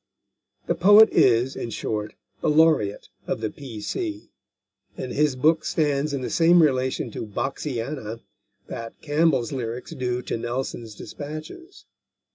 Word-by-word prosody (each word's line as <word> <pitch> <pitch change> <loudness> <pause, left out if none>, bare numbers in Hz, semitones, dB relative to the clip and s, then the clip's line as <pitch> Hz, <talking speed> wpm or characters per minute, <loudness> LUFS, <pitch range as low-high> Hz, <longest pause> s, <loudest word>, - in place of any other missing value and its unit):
The - - +1
poet 205 +5 +7
is, 125 +2 +3
in 120 - -4
short, 105 -2 -4 0.3
the - - +1
laureate 150 -10 +3 0.2
of - - -1
the 110 -1 -3
P.C., 150 - -5 0.7
and 130 - -5
his 150 -1 +1
book 155 +5 +3
stands 150 -2 0
in 140 -2 -2
the 125 - -3
same 170 0 +5
relation 130 -4 0
to 110 - -6
Boxiana 120 0 -4 0.4
that 115 0 -8
Campbell's 145 -5 +2
lyrics 125 -1 -5
do 125 -4 -2
to - - -3
Nelson's 120 -2 -4
despatches. 155 - -9
135 Hz, 130 wpm, -24 LUFS, 115-155 Hz, 0.7 s, poet